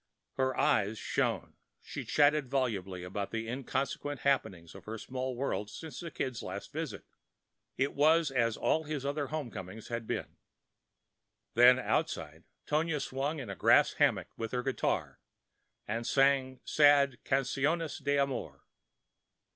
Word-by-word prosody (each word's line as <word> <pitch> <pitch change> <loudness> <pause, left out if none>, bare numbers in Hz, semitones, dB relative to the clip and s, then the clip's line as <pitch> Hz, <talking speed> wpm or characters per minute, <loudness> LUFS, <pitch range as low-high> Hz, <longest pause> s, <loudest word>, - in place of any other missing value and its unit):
Her 130 -1 0
eyes 110 -7 +2
shone; - - -1 0.2
she - - -7
chatted 145 -2 +3
volubly 100 -9 -1
of 90 +1 -9
the 110 +3 -3
inconsequent 135 +2 -3
happenings 95 -12 0
of - - -12
her 110 +1 -5
small 130 +3 -4
world 120 -5 -2
since 160 +5 -8
the 170 - -5
Kid's 130 -6 -3
last - - -6
visit; - - -5 0.7
it 140 +1 +1
was 155 +1 +4
as 115 -4 +1
all 160 0 +1
his 145 -2 -4
other 145 0 -1
home 150 -5 -4
comings 95 +2 -8
had 115 -2 -4
been. - - -4 1.2
Then 125 +2 +7
outside - - -2 0.2
Tonia 155 0 0
swung 140 +4 -2
in 125 -8 -5
a - - -5
grass - - +5
hammock - - +2
with 115 +1 -5
her 125 0 -1
guitar 135 0 -1 0.7
and 115 +3 -2
sang 135 -1 +2
sad 140 -4 +5
canciones 140 +4 0
de 145 0 +2
amor. 130 - -2
130 Hz, 140 wpm, -31 LUFS, 115-145 Hz, 1.2 s, Then